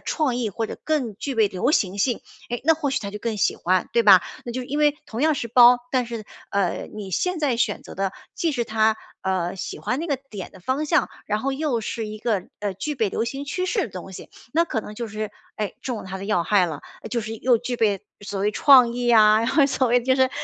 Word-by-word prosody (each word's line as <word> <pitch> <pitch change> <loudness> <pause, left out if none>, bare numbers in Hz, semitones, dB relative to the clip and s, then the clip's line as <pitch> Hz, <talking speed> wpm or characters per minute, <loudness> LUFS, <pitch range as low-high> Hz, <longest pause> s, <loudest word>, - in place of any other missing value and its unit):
创 280 -7 0
意 235 -3 -1
或 225 +3 -2
者 - - -7
更 260 -10 -1
具 275 +2 -4
备 220 -3 +3
流 190 +9 0
行 195 -5 +1
性， 240 +3 +1 0.3
诶， 240 - -2
那 320 - +6
或 300 -2 -2
许 275 - 0
她 200 -2 -5
就 210 - -6
更 225 -1 -3
喜 - - +1
欢， 185 +1 +1
对 235 - +4
吧？ 190 -4 +8 0.2
那 240 - -5
就 255 +1 -3
因 285 +4 -3
为 295 -1 +3
同 230 0 -5
样 315 -1 +4
是 235 -4 -4
包， 245 +1 +7
但 255 -2 +1
是， 230 -2 -6 0.3
呃， 195 -3 0
你 200 -3 -6
现 360 - 0
在 275 -6 +1
选 225 -3 0
择 - - -11
的 195 0 -1 0.2
既 330 -2 0
是 240 -4 -1
她， 220 0 +2 0.3
呃， 185 -1 -1
喜 - - -5
欢 255 - -1
那 335 - -3
个 285 -4 0
点 200 -4 -7
的 190 - -14
方 270 +9 -1
向， - - +2 0.2
然 210 +1 -1
后 275 +4 -1
又 270 -4 -1
是 220 0 -4
一 215 0 -7
个， 210 -5 -1 0.2
呃， 205 -2 -1
具 295 +10 -3
备 225 -6 +1
流 225 - -1
行 275 +4 -4
趋 365 +6 -2
势 405 +1 +1
的 - - -3
东 185 +1 -8
西， - - -10 0.2
那 335 - +4
可 225 -9 -2
能 210 - -9
就 235 +1 -4
是， 215 0 -4 0.3
诶， 210 -2 -3
中 245 -4 -3
了 - - -8
她 190 0 -6
的 195 - -7
要 190 -5 +1
害 195 -4 +3
了。 155 -4 -5 0.3
就 235 - 0
是 225 +1 -5
又 245 0 +3
具 245 +2 -3
备 205 -4 +1 0.2
所 200 -1 -5
谓 205 +2 +2
创 255 -3 +6
意 245 0 -2
呀， 215 -2 +6
然 230 - 0
后 280 -1 +4
所 265 -2 +1
谓 245 +1 +4
就 260 +2 +3
是， 260 0 +3
230 Hz, 280 characters per minute, -23 LUFS, 205-265 Hz, 0.3 s, 吧